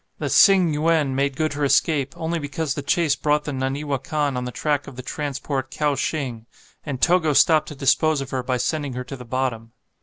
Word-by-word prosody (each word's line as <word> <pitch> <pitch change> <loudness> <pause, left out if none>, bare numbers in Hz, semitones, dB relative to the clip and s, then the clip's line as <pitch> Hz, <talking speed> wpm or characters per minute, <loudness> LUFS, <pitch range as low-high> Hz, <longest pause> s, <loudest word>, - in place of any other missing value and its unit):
The - - -3
"Tsing 185 -6 +5
Yuen" 155 -2 +1
made 140 0 0
good 155 +1 -1
her 145 0 -3
escape, 140 -1 +2
only 165 +1 -2
because 145 0 -3
the 145 - -4
chase 145 +1 +1
brought 150 0 +1
the 150 - -4
"Naniwa 135 +1 -2
Kan" 145 -1 -1
on 125 0 -3
the 125 - -4
track 145 +2 -1
of - - -10
the 130 - -8
transport 140 -1 -4
"Kowshing," 140 -5 -2 0.4
and 140 -4 -5
Togo 170 -2 +3
stopped 155 +2 +4
to 150 - -8
dispose 145 +2 +2
of 135 -1 -6
her 130 - -1
by 125 0 -1
sending 145 +1 -2
her 125 +1 -4
to 135 - -8
the 125 -1 -10
bottom. 115 -2 -3
140 Hz, 210 wpm, -22 LUFS, 130-155 Hz, 0.4 s, Tsing